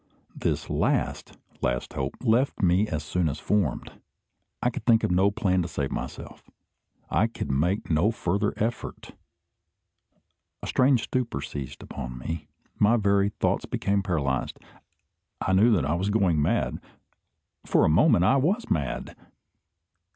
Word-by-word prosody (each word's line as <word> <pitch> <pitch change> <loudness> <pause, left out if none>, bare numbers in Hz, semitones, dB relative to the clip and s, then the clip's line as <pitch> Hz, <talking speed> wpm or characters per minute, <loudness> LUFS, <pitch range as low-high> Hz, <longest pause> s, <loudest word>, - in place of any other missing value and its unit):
This - - -2
last - - -1 0.2
last 60 0 -1
hope 65 +1 -3
left 120 0 +2
me 90 +4 +3
as 80 -5 -3
soon 80 +2 0
as 70 - -4
formed. 95 -11 -1 0.6
I 125 - +1
could - - -6
think 115 -2 +4
of - - +1
no 95 +3 +4
plan 100 -3 +1
to 85 - -2
save 70 -4 -3
myself. - - -7 0.6
I 110 - +3
could 115 -10 -5
make 85 +9 0
no 80 +7 +3
further 100 -1 0
effort. 115 +3 -4 1.5
A - - -3
strange 130 -2 +3
stupor 125 -2 -2
seized 70 -3 -6
upon 60 -2 -7
me. 80 +4 -5 0.3
My 110 +3 +5
very 100 -1 +2
thoughts - - -1
became 100 0 0
paralysed. 75 -9 -1 0.8
I 95 - 0
knew 105 +6 +5
that 85 -10 +2
I 75 - 0
was 95 +4 -1
going 95 -7 +2
mad. - - 0 0.8
For - - +3
a - - +4
moment 90 - +4
I 135 - +4
was 190 - 0
mad! 70 -6 -2
95 Hz, 145 wpm, -26 LUFS, 75-110 Hz, 1.5 s, My